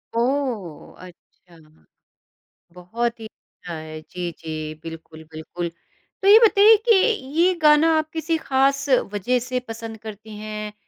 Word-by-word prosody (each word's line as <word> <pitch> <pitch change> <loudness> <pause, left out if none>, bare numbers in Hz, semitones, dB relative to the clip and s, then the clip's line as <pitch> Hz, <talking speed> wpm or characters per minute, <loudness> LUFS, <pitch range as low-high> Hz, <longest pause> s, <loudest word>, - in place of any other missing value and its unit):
ओह! 235 - -2
अच्छा। 175 -1 -19 1.2
बहुत 230 +7 -4
ही 220 - -8
अच्छा 175 -4 -12
है। 155 0 -8
जी, 175 +2 -6
जी, 155 -1 -6
बिल्कुल, 160 -1 -10
बिल्कुल, 165 +2 -6 0.5
तो 390 - 0
ये 430 +3 +9
बताइए 440 -1 +6
कि 445 - +7 0.4
ये 365 +2 +4
गाना 300 +1 +5
आप 310 0 -2
किसी 325 0 -1
ख़ास 275 0 +1 0.3
वज़ह 245 +5 0
से 255 -1 -1
पसंद 225 0 -8
करती 215 0 -9
हैं, 215 0 -6
220 Hz, 130 wpm, -22 LUFS, 175-280 Hz, 1.2 s, ये